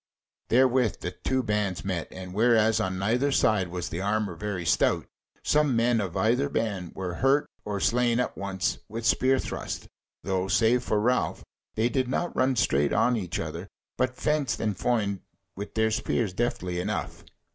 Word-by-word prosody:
Therewith 125 -2 +3
the 90 - -3
two 130 +7 -1
bands 105 -5 -1
met, 90 -4 -2
and 95 -1 -8
whereas 110 0 +4
on 95 -3 -1
neither 120 +9 +1
side 105 -7 +2
was 90 0 -4
the 85 +3 -4
armour 105 -1 0
very 95 -1 -4
stout, 75 -2 +2 0.4
some 150 -4 +3
men 115 0 +3
of 95 -4 -4
either 125 +6 +2
band 105 -8 -2
were 90 -2 -4
hurt 135 +2 +3 0.2
or 105 -1 -2
slain 120 +2 +2
at 125 - -1
once 95 -3 -2
with 115 +1 -5
spearthrust; 130 +2 0 0.4
though, 95 0 -1
save 115 +4 +3
for 110 -3 0
Ralph, 125 +4 0 0.3
they 110 +2 +2
did 130 +1 0
not 170 +7 -2
run 130 0 +2
straight 70 - +2
on 125 - +3
each 95 -6 -3
other; - - -5 0.3
but 130 0 0
fenced 150 -4 0
and 105 -3 -1
foined 105 -5 0 0.4
with 100 +2 -7
their 110 0 +2
spears 110 -2 0
deftly 90 -5 -2
enough. 90 - -3
110 Hz, 170 wpm, -27 LUFS, 95-125 Hz, 0.4 s, whereas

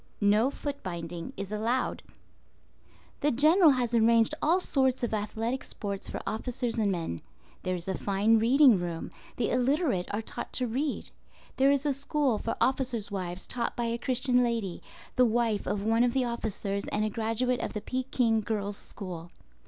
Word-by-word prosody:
No 210 +4 +4
foot 285 0 -5
binding 170 -2 -5
is 200 0 -5
allowed. 230 +4 -1 1.2
The 295 - +2
General 310 +7 +5
has 250 -4 +1
arranged 230 +2 +4
all 335 +5 +4
sorts 265 -7 +1
of 235 - -1
athletic 225 +4 -2
sports 200 -2 -5
for - - -4
officers 235 +1 -2
and 205 -2 +2
men. 165 - -3 0.4
There 185 0 -1
is 175 0 -7
a 190 - -1
fine 210 +3 +2
reading 250 -1 +6
room; 170 -2 -4 0.3
the 235 - 0
illiterate 255 - +1
are 210 +2 -2
taught - - -6
to 255 - +1
read. 270 +5 -2 0.5
There 270 +1 +5
is 280 0 +2
a 290 - +2
school 275 -4 0
for 230 - -3
officers' 250 -5 0
wives 185 -2 -4
taught 235 -1 -3
by 240 - -1
a 230 0 -1
Christian 250 0 +2
lady, 225 -7 -2 0.4
the 250 - +6
wife 225 -2 0
of 200 -1 -1
one 225 +2 +3
of 245 -1 +2
the 260 -1 +2
officers 210 -4 -3
and 210 0 0
a - - 0
graduate 230 +3 0
of - - -3
the 210 - -3
Peking 250 -3 0
Girls' 205 -2 -2
School. 175 -3 -6
230 Hz, 175 wpm, -29 LUFS, 205-255 Hz, 1.2 s, reading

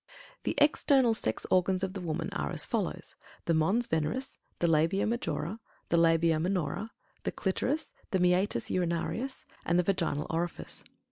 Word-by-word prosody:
The - - 0
external 275 -4 +4
sex 110 - -1
organs 185 +1 +3
of 190 -1 -2
the 195 - -5
woman 165 -1 -3
are 70 -1 -2
as - - -3
follows: - - -3 0.3
The 170 - +2
Mons 190 +10 +3
Veneris; 160 - -2 0.2
the - - 0
Labia 165 +4 +3
Majora; 220 -3 -2 0.3
the 170 - +3
Labia 165 -1 +4
Minora; 180 +3 -1 0.3
the - - -2
Clitoris; 255 +10 -1 0.2
the 190 - +1
Meatus 180 - +2
Urinarius; 180 +9 -2 0.2
and 175 - +2
the 180 - +4
Vaginal 170 -6 0
Orifice. 170 +1 -4
180 Hz, 150 wpm, -30 LUFS, 165-205 Hz, 0.3 s, external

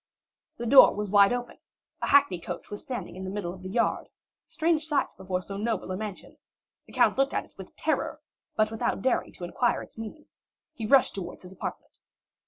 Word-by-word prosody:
The 235 - -4
door 260 +3 +8
was 210 -1 -3
wide 200 -1 +6
open, 245 0 -4 0.4
a - - -1
hackney 195 -11 +4
coach 170 - -7
was 205 - -6
standing 250 -7 -6
in 190 - -7
the 190 - -4
middle 190 -3 -4
of 185 - -12
the 185 - -7
yard—a 230 +4 0 0.4
strange 320 -1 +1
sight 295 -3 +2
before 185 0 -3
so 195 +1 -6
noble 215 -3 -2
a - - -1
mansion; 205 -1 -7 0.5
the - - -15
count - - +3
looked 275 +1 +2
at - - -1
it - - -25
with - - -11
terror, - - -1 0.4
but 215 0 +2
without 220 -2 -1
daring 260 - +1
to - - -10
inquire 235 +7 0
its - - -14
meaning, 225 +7 -8 0.5
he 225 -2 -5
rushed 270 +2 +5
towards 190 -1 -7
his 180 - -11
apartment. 190 - -7
210 Hz, 200 wpm, -27 LUFS, 190-245 Hz, 0.5 s, door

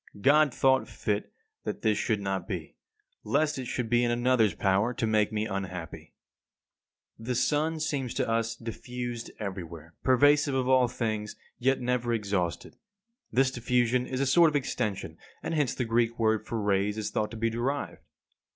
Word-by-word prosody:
God 145 +6 +5
thought 130 +1 +3
fit 105 -1 -3 0.3
that - - -5
this 110 -2 +3
should 110 -1 0
not 95 -1 -2
be; 90 -7 -5 0.5
lest 155 -2 +1
it 130 - -4
should 120 0 -2
be 120 +1 +3
in 120 - +2
another's 120 -3 +2
power 100 +5 +1
to - - 0
make 110 -1 +2
me 110 0 -1
unhappy. 95 -5 -6 1.0
57. - - -11
The 125 - 0
sun 150 +6 +1
seems 140 -5 -2
to - - 0
us 115 0 0
diffused 120 +1 -6
everywhere, 85 -5 -7
pervasive 145 +2 +4
of 130 -1 0
all 130 -1 +5
things, 110 -3 -3 0.2
yet 135 +1 +2
never 120 -1 0
exhausted. 100 -5 -2 0.5
This 130 +1 +3
diffusion 125 0 +1
is 130 - -3
a - - +2
sort 165 +5 +6
of 150 - -5
extension, 105 - -2 0.2
and - - -3
hence 150 -5 +1
the 125 - -1
Greek 115 +1 +1
word 110 -1 +1
for 115 - -2
rays 100 0 +1
is 110 - -3
thought 105 0 -1
to 115 - -8
be 115 +1 0
derived. 130 +5 -2
120 Hz, 170 wpm, -28 LUFS, 105-130 Hz, 1.0 s, sort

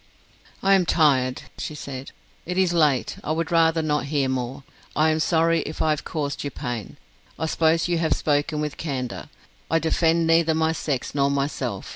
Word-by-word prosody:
"I 195 0 +5
am 185 -3 +3
tired," 130 -5 +2 0.2
she 155 - -4
said. 135 -2 -7 0.4
"It 180 +1 -3
is 185 -2 +3
late, 150 -6 +2
I 155 - -1
would 165 +1 -2
rather 165 -1 +3
not 150 -2 0
hear 140 -2 0
more. 130 +1 -3 0.3
I 155 +1 +3
am 155 - 0
sorry 165 +1 +2
if 155 - -7
I 155 - +2
have 150 - -1
caused 145 -3 -3
you 145 - -2
pain. 120 - -5 0.4
I - - -2
suppose 160 +1 +2
you 175 -1 +1
to - - -1
have 160 - +2
spoken 150 +1 0
with 150 -1 -4
candour. 130 -6 -4 0.4
I 165 - +3
defend 165 0 +2
neither 165 0 +3
my 160 0 +2
sex 145 -5 -3
nor 140 -1 +2
myself. 140 +1 -2
155 Hz, 190 wpm, -24 LUFS, 140-165 Hz, 0.4 s, I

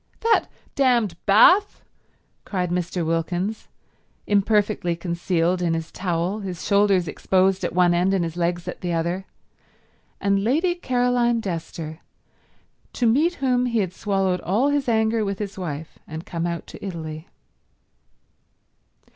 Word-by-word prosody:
"That 455 0 +3 0.3
damned 240 -9 +2
bath!" 365 - +5 0.6
cried 180 -3 -2
Mr. 180 -1 -1
Wilkins, 175 +6 -2 0.6
imperfectly 205 -3 +1
concealed 170 +1 0
in 170 -2 +1
his 165 0 -5
towel, 180 +2 -2
his 185 -4 -6
shoulders 200 -3 +3
exposed 190 +5 +1
at - - -1
one 180 -1 +4
end 180 +2 +2
and 185 - +1
his 165 -1 -4
legs 175 0 -1
at - - -6
the 175 -1 -2
other, 170 +3 -1 0.9
and 200 0 +1
Lady 315 - +2
Caroline 245 -6 +1
Dester, 165 -4 -5 0.9
to 245 - 0
meet 300 +10 +3
whom 250 -3 +1
he 235 -1 -1
had 185 -4 0
swallowed 190 -3 0
all 225 +10 +1
his 285 -3 0
anger 220 0 +2
with 200 -1 -2
his 205 -1 -5
wife 160 -4 -6
and 160 +2 -7
come 170 -1 -3
out 170 -1 -4
to - - -12
Italy. 160 -3 -6
190 Hz, 140 wpm, -23 LUFS, 170-220 Hz, 0.9 s, bath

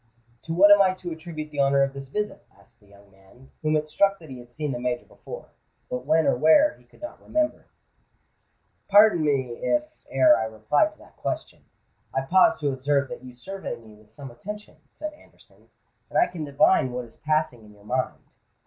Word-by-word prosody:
"To 165 - -5
what 200 +3 +7
am 205 0 +8
I 185 -1 +3
to 180 -2 -7
attribute 160 -2 -7
the 145 - -6
honour 140 0 +4
of 135 0 -1
this 135 0 -8
visit?" 210 +9 -4
asked 100 - -23
the 105 - -25
young 100 0 -20
man, 95 +7 -21
whom 155 0 +1
it 155 0 0
struck 200 +5 +2
that 160 -6 -13
he 130 - -8
had 120 0 -14
seen 150 +3 -3
the 120 - -4
Major 125 0 -2
before—but 125 +1 -10
when 160 +1 +3
or - - +3
where 160 - +5
he 125 - -24
could 125 - -21
not 305 - -8
remember. 310 0 -1 1.2
"Pardon 205 -4 +6
me 130 -5 0
if, 300 0 +1 0.3
ere 305 0 +6
I - - -1
reply 110 - +1
to 310 - -21
that - - -19
question, - - -5 0.5
I 135 - +2
pause 190 +10 +4
to 145 -2 0
observe 140 +1 0
that - - -8
you 125 -1 -11
survey 195 +10 -6
me 110 -2 -16
with 105 0 -20
some 135 -1 -10
attention," 210 - -9
said 305 0 -6
Anderson; 300 - -21 0.4
"and - - -2
I 350 - +6
can 165 - -6
divine 140 -1 +3
what 125 0 -4
is 115 - -19
passing 155 -6 -1
in 105 - -16
your 100 0 -20
mind. 130 +3 -3
145 Hz, 205 wpm, -25 LUFS, 125-185 Hz, 1.2 s, am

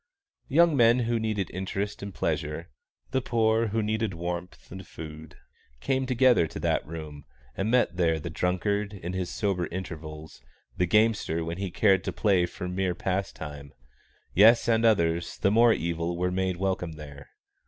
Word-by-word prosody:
Young 165 +2 +4
men 120 -1 +5
who 115 0 0
needed 110 -5 -2
interest 95 +3 -4
and 100 0 -6
pleasure, 75 -2 -3 0.4
the 130 - +1
poor 115 -1 +2
who 110 +1 -1
needed 110 -2 -1
warmth 85 +1 -6
and 95 0 -9
food, 80 0 -10 0.4
came 130 - -1
together 125 -7 +4
to - - -8
that - - 0
room, 75 -3 -8 0.3
and 100 - -1
met 120 -7 +2
there 80 -3 +2
the 80 +2 -6
drunkard 100 +5 -1
in 90 -1 -6
his 95 -1 -2
sober 95 -4 -1
intervals, 80 -4 -8 0.3
the 90 - +1
gamester 105 -5 +2
when 85 +2 -5
he 100 -1 -2
cared 95 0 +3
to - - -1
play 95 -5 +2
for 90 - -6
mere 90 0 -1
pastime; 80 -8 -4 0.6
yes, 115 +5 +6
and 115 0 +3
others, 85 -6 +2
the 100 - +2
more 115 +2 +6
evil, 85 -2 -1
were 90 +1 0
made 95 -1 -1
welcome 95 -3 -2
there. 70 -2 -11
95 Hz, 165 wpm, -27 LUFS, 85-110 Hz, 0.6 s, yes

